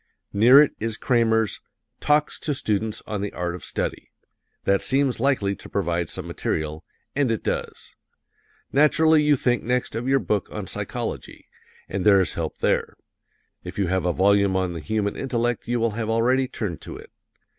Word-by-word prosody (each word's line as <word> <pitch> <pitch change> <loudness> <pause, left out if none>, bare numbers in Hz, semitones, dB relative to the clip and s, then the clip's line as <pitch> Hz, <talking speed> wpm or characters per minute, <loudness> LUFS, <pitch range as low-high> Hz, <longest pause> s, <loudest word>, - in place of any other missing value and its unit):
Near 120 +7 +7
it 150 - +5
is 110 0 -2
Kramer's 115 -4 +2 0.4
"Talks 150 0 +1
to 145 - -2
Students 110 -3 -2
on 105 -2 -4
the 100 - -3
Art 90 -1 -3
of 90 - -8
Study" - - -4 0.5
that 100 0 +2
seems 135 -2 +1
likely 115 -7 +1
to - - -13
provide 85 -4 -1
some - - -5
material, 75 0 -3 0.3
and 140 -2 +2
it 115 -2 -1
does. - - -4 0.8
Naturally 155 +2 +4
you 150 -1 +4
think 125 -2 +1
next 125 -1 -1
of 120 +3 -3
your 135 +1 +4
book 105 -6 -1
on - - -5
psychology, - - -5 0.4
and 95 -1 -3
there 100 -2 +6
is 95 - +1
help 80 -2 -4
there. - - 0 0.7
If - - -8
you 100 -4 0
have 95 -1 0
a - - +3
volume 100 +1 +3
on 95 -2 0
the 85 - -5
human 105 +4 -2
intellect 120 -3 -2
you 120 0 0
will 115 0 +1
have 110 +1 -3
already 125 +4 +2
turned 100 - -5
to - - -8
it. - - -14
110 Hz, 175 wpm, -24 LUFS, 100-130 Hz, 0.8 s, Near